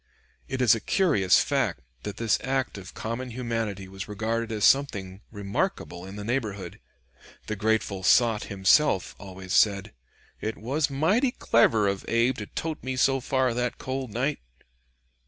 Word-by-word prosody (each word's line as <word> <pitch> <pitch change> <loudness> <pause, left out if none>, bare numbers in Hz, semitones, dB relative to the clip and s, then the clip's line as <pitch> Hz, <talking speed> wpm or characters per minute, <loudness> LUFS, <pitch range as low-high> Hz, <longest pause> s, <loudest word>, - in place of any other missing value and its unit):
It 130 -1 -1
is 115 - +6
a 115 - 0
curious 105 - +3
fact - - 0 0.2
that 105 - -6
this 115 -2 +1
act 130 -1 -1
of 95 - -12
common 115 +3 -4
humanity 115 -5 -3
was 95 +1 -7
regarded 110 +2 -2
as 105 -2 +1
something 100 -9 +2
remarkable 100 -3 -3
in 95 - -9
the 105 - -6
neighborhood; 105 -6 -3 0.7
the 110 - -3
grateful 105 -2 0
sot 110 +3 +3
himself 95 - +3
always 95 -2 -7
said 100 0 +3 0.5
"it 110 +1 -4
was 140 +7 -1
mighty 175 - +2
clever 115 - +3
of 100 -1 -1
Abe 115 +2 +2
to 105 - -6
tote 160 -1 -4
me 130 0 -3
so 135 +1 +3
far 130 -1 0
that 125 0 -2
cold 130 -1 -4
night." 130 +7 -1
110 Hz, 155 wpm, -26 LUFS, 100-130 Hz, 0.7 s, is